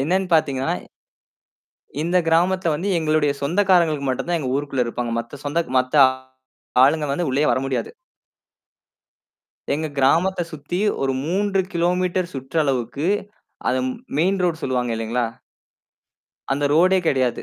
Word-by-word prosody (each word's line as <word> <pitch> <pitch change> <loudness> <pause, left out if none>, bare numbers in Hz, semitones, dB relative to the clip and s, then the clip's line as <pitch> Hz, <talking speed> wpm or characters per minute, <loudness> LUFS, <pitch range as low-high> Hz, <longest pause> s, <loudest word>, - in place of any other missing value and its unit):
என்னன்னு 185 +6 0
பார்த்தீங்கன்னா, 135 -4 +1 1.3
இந்த 175 +2 +1
கிராமத்துல 175 0 +2
வந்து 185 +7 -3
எங்களுடைய 155 -2 +2
சொந்தக்காரர்களுக்கு 170 -3 +2
மட்டும் 130 - -2
தான் 170 -1 +1
எங்க 130 -3 -3
ஊருக்குள்ள 140 -4 -1
இருப்பாங்க. 120 0 -3
மத்த 125 +4 -8
சொந்த 165 +4 0 0.2
மத்த 130 +4 -2 0.9
ஆளுங்க 150 +2 +3
வந்து 170 +1 -1
உள்ளேயே 145 +3 +1
வர - - +1
முடியாது. 135 - -2 1.9
எங்க 155 +1 -2
கிராமத்த 170 +8 +3
சுத்தி 155 +4 -4 0.2
ஒரு 135 0 +1
3 195 +3 +1
கிலோமீட்டர் 180 +1 0
சுற்றளவுக்கு, 135 0 -1 0.6
அத 130 - +1 0.4
மெயின் 190 +3 +2
ரோட் 165 -2 -1
சொல்லுவாங்க 125 -3 -1
இல்லீங்களா? 115 +2 -1 1.3
அந்த 145 +1 -1
ரோடே 185 +4 +4
கிடையாது. 130 -3 0
155 Hz, 120 wpm, -22 LUFS, 135-175 Hz, 1.9 s, ரோடே